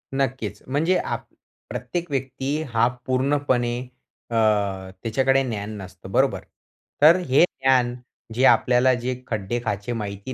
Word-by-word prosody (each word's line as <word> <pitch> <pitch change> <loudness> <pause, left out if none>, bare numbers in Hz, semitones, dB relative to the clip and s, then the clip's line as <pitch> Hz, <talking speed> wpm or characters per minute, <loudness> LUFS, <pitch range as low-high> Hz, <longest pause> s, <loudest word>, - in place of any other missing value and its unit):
नक्कीच. 125 -6 -2
म्हणजे 155 +8 +2
आप - - -3 0.4
प्रत्येक 175 -2 -4
व्यक्ती 135 +3 -2
हा 115 +1 +4 0.2
पूर्णपणे 130 -2 +1 0.5
अ, 115 - -3 0.7
त्याच्याकडे 135 +4 +2
ज्ञान 105 -5 -4
नसतं, 95 -2 -10
बरोबर. - - +2 0.6
तर 155 +3 +8
अ, - - -1
हे 135 +5 +5
ज्ञान 130 -6 +2 0.4
जे 125 +4 0
आपल्याला 125 0 +5
जे 125 +1 -2
खड्डे-खाचे 110 +1 -2
माहिती 105 +2 -5
130 Hz, 120 wpm, -23 LUFS, 115-135 Hz, 0.7 s, तर